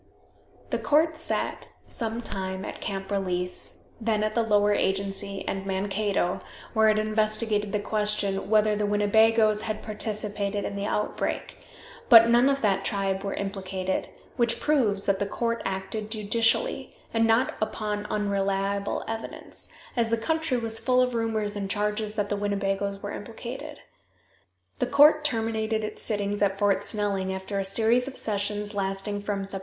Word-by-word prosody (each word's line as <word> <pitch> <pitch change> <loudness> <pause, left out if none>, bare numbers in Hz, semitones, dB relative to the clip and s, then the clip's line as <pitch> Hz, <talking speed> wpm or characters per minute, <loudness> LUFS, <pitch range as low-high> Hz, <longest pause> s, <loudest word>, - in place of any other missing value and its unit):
The - - 0
court 310 +2 +2
sat 325 - -1 0.2
some 230 +1 -3
time 190 -2 -3
at - - -7
Camp 195 -1 -4
Release, 180 -2 -2 0.2
then 215 -1 +1
at 215 0 0
the 235 - +2
Lower 210 -2 +3
Agency, 195 0 -1
and 195 0 -2
Mankato, 195 -1 0 0.3
where 220 -1 +5
it 215 - +3
investigated 215 -1 0
the 210 - 0
question 205 -2 0
whether 215 -1 +4
the 210 0 0
Winnebagoes 215 +1 +4
had 215 -1 -4
participated 210 -1 -2
in 200 - -4
the 200 +1 -2
outbreak; 210 - -2 0.5
but 230 -1 +9
none 240 +3 +5
of 275 -2 0
that 200 -3 +2
tribe 195 -1 -1
were 195 - -2
implicated, 190 -1 -3 0.3
which 235 -1 +2
proves 235 -9 +2
that 195 -1 +1
the 200 - 0
court 230 +2 -1
acted 195 +3 -3
judicially, 225 - 0 0.2
and 225 0 +3
not 230 +4 +3
upon 210 -1 -2
unreliable 200 -1 -1
evidence, 225 0 -4 0.2
as 235 -2 +1
the 230 - +2
country 315 +3 0
was 225 -1 0
full 250 +2 +2
of 250 0 +2
rumors 220 -3 -1
and 200 -1 -3
charges 210 +1 -1
that 205 -2 0
the 205 - 0
Winnebagoes 200 -1 -1
were 205 - -4
implicated. 260 +8 -7 1.0
The - - +1
court 300 +2 +6
terminated 225 -4 0
its 215 - -5
sittings 205 -1 +1
at 195 -1 +2
Fort 200 -1 +2
Snelling, 200 -3 0
after 190 +1 -3
a - - 0
series 225 +6 +2
of 270 - -6
sessions 205 0 -1
lasting 195 +1 -2
from 200 -1 -2
Sept. 195 0 -5
210 Hz, 155 wpm, -26 LUFS, 200-225 Hz, 1.0 s, but